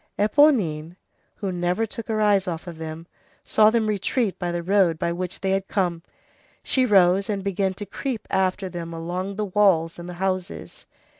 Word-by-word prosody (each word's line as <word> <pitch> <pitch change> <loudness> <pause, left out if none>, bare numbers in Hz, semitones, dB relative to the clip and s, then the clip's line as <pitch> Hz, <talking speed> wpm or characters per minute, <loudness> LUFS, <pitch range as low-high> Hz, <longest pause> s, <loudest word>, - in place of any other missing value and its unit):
Éponine, 205 - +3 0.4
who 195 -3 -3
never 180 +4 0
took 225 +1 -8
her 220 -2 -1
eyes 205 -2 +3
off 170 -1 -4
of 170 -3 -9
them, 160 +1 -6 0.4
saw 215 0 +5
them 225 0 +1
retreat 210 -1 -1
by 175 -1 -2
the 175 0 -3
road 185 -3 +3
by 170 - -1
which 180 +1 -5
they 190 0 0
had 195 0 0
come. 175 -4 -1 0.6
She 260 -1 +1
rose 195 0 +4
and 200 -2 -2
began 195 -1 -1
to 205 - -7
creep 230 +3 -4
after 190 +1 0
them 170 -2 -6
along 180 +4 -4
the 210 +1 -2
walls 185 -5 +2
and 175 +1 -8
the - - -6
houses. 185 0 -4
190 Hz, 180 wpm, -24 LUFS, 175-210 Hz, 0.6 s, saw